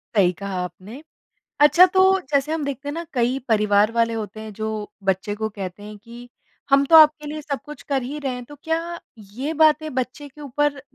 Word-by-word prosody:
सही 185 -3 +4
कहा 195 +2 -6
आपने। 185 - -9 0.6
अच्छा, 305 +5 +7
तो 380 +1 +3
जैसे 280 +2 +1
हम 315 -3 -2
देखते 280 0 -5
हैं 290 - -3
ना 335 +1 -5
कई 245 0 0
परिवार 210 -1 +3
वाले 230 -1 +1
होते 215 -1 -6
हैं 220 -1 -8
जो 220 +2 -4 0.4
बच्चे 195 +2 -1
को 220 +1 -3
कहते 200 -2 -8
हैं 210 0 -9
कि 240 +1 -12 0.4
हम 275 0 +5
तो 325 - +9
आपके 305 -1 +6
लिए 305 +1 -5
सब 280 -1 -4
कुछ 295 -3 -10
कर 275 -3 -1
ही 285 +4 -5
रहे 275 -3 -3
हैं, 250 - -7
तो 290 +4 -13
क्या 335 +1 -3 0.3
ये 270 +8 -3
बातें 310 -1 +2
बच्चे 260 +3 -4
के 295 +3 -17
ऊपर 285 +1 -1
265 Hz, 210 wpm, -22 LUFS, 215-300 Hz, 0.6 s, तो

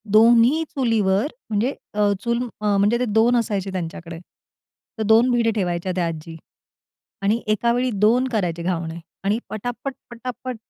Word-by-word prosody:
2न्ही 235 +7 +6
चुलीवर 225 -4 +2 0.2
म्हणजे 225 +6 0 0.2
अ, 205 -1 +2
चूल 235 +1 0 0.2
अ, 205 -1 +2
म्हणजे 205 +4 +3
ते 250 - +1
2 225 +2 +3
असायचे 205 -5 -1
त्यांच्याकडे, 170 -2 -5 0.8
तर 220 - -1
2 225 +4 +5
भिडे 235 -2 +2
ठेवायच्या 180 -2 -1
त्या 175 -2 0
आजी. 165 0 -6 0.9
आणि 210 +4 +2
एकावेळी 235 +4 +1 0.2
2 245 +4 +3
करायचे 180 -8 -1
घावणे 170 -1 -3 0.2
आणि 205 +3 +1
पटापट, 245 +5 -5 0.2
पटापट. 250 +1 -6
215 Hz, 140 wpm, -22 LUFS, 190-240 Hz, 0.9 s, 2न्ही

